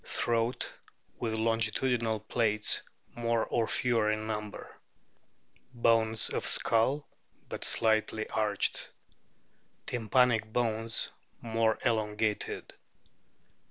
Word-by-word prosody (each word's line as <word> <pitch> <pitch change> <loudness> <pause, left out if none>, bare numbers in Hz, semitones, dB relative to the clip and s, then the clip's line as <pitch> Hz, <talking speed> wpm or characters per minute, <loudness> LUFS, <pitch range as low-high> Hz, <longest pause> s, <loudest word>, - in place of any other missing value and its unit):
Throat 115 +1 0 0.5
with 115 -2 -1
longitudinal 115 0 0
plaits 110 -2 +1 0.3
more 115 -1 0
or 115 -2 0
fewer 115 -3 +2
in 110 0 -2
number. 105 -1 -5 1.0
Bones 115 -2 +3
of - - -1
skull 130 +6 +2 0.4
but - - -5
slightly 110 0 +1
arched. 105 -2 0 1.0
Tympanic 115 -1 +2
bones 115 -1 0 0.3
more 115 -1 +1
elongated. 110 -2 -1
110 Hz, 85 wpm, -30 LUFS, 110-115 Hz, 1.0 s, Bones